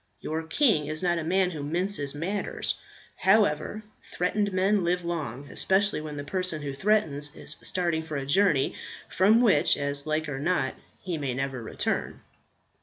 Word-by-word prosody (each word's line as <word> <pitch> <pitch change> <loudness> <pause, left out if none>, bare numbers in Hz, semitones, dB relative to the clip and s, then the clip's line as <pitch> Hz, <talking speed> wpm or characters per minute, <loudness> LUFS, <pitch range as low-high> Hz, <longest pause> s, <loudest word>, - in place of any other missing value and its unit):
Your 160 +1 -3
king 165 - +2
is 155 +3 -3
not 175 -1 +2
a - - -3
man 185 +2 +2
who 155 -4 -5
minces 155 -1 -1
matters. 190 +7 -2 0.4
However, 200 0 +2 0.3
threatened 200 +3 0
men 190 +1 +2
live 175 0 0
long, 145 -6 -4
especially 195 -3 +1
when 150 -1 -6
the 145 - -4
person 180 -1 -2
who 140 -1 -3
threatens 150 -4 0
is - - 0
starting 170 -3 0
for 160 -1 -6
a 135 - -3
journey, 150 -2 +3 0.4
from 210 +6 +4
which, 200 -12 +4
as 140 +1 -1
like 155 0 0
or 140 -2 -4
not, 150 -4 0 0.3
he 175 -4 -4
may 135 -4 -2
never 135 -1 -3
return. 110 - -2
160 Hz, 165 wpm, -27 LUFS, 145-190 Hz, 0.4 s, from